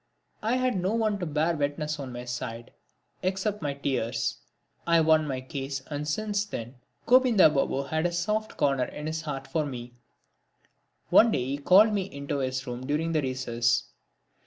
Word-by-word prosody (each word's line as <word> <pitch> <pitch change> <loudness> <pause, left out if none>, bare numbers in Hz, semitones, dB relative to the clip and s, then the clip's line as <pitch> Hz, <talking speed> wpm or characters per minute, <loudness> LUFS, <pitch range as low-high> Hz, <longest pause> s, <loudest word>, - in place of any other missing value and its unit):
I 225 +3 +1
had 255 -7 +1
no 190 +5 0
one 215 -3 +1
to 175 - -3
bear 155 +3 +1
witness 150 +1 -2
on 135 -2 -6
my 120 0 -7
side 120 -1 -5 0.5
except 195 +3 -1
my 145 -2 -2
tears. 125 -4 -1 0.5
I 170 0 +5
won 155 -1 +4
my 130 -2 -3
case 135 0 -5
and 145 +1 -3
since 205 +6 0
then 120 - -7 0.3
Govinda 245 -9 +6
Babu 140 -1 0
had 160 +4 0
a - - -4
soft 210 +5 -2
corner 135 -3 +2
in 150 - -8
his 160 +1 -2
heart 145 -4 -5
for 160 -2 0
me. 125 -4 -7 1.2
One 230 - +7
day 125 - 0
he 135 +2 -2
called 200 +8 +6
me 195 -2 -2
into 140 0 -3
his 130 0 -2
room 125 0 -5
during 155 +3 0
the 155 -2 +2
recess. 120 -3 0
150 Hz, 175 wpm, -27 LUFS, 130-185 Hz, 1.2 s, One